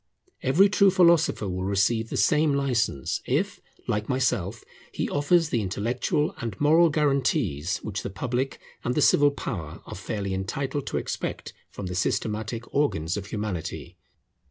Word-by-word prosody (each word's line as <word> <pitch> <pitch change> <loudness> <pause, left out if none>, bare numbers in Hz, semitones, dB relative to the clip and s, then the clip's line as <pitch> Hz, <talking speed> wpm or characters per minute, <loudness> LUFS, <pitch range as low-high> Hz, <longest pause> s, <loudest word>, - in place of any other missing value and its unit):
Every 155 +10 +5
true 200 -1 +4
philosopher 170 - +4
will 90 0 -3
receive 100 +4 +1
the - - -3
same 150 -1 +3
licence, 120 - 0
if, - - 0 0.3
like 105 +1 -1
myself, 120 -5 0 0.3
he - - -2
offers 155 +3 +2
the 120 -6 0
intellectual 115 - -1
and 115 -5 -5
moral 160 +3 +5
guarantees 135 - +1
which 100 -3 -3
the - - -4
public 125 +6 -2 0.2
and 125 - -1
the - - +2
civil 145 0 +5
power 95 - -6
are - - -8
fairly 100 -2 -4
entitled 130 +9 -3
to - - -2
expect - - -4 0.2
from 100 - -7
the 90 - -4
systematic 110 +4 -1
organs 90 - +1
of 100 -1 -5
Humanity. 95 -4 -4
115 Hz, 150 wpm, -26 LUFS, 100-145 Hz, 0.3 s, Every